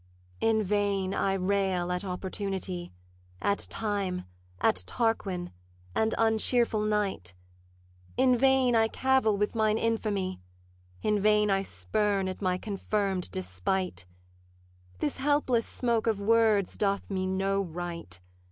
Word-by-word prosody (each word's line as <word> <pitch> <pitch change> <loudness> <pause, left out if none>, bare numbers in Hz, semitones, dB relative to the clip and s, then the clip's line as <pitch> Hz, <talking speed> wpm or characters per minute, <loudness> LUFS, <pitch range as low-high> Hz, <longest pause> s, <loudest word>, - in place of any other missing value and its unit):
'In 220 -1 +2
vain 200 -1 0
I 195 0 +1
rail 190 -2 0
at 180 +1 -2
Opportunity, 190 -1 -4 0.5
At 200 - 0
Time, 200 -4 -2 0.3
at 90 - +2
Tarquin, 195 - -1 0.4
and 220 0 +1
uncheerful 225 0 +3
Night; 195 - -1 0.8
In 255 -1 +5
vain 265 -1 +4
I 225 0 +4
cavil 260 -4 +2
with 210 +1 0
mine 220 -1 +2
infamy, 210 - -1 0.6
In 210 -1 +2
vain 210 0 +3
I 195 0 +2
spurn 195 - 0
at 185 - -5
my 185 -2 +1
confirm'd 195 -2 -1
despite: 95 - -2 0.9
This 145 - -2
helpless 265 -4 +2
smoke 235 -2 0
of 220 -3 +1
words 215 -2 +2
doth 200 -1 0
me 185 -1 -1
no 195 +1 0
right. 170 - -6
200 Hz, 120 wpm, -29 LUFS, 185-220 Hz, 0.9 s, In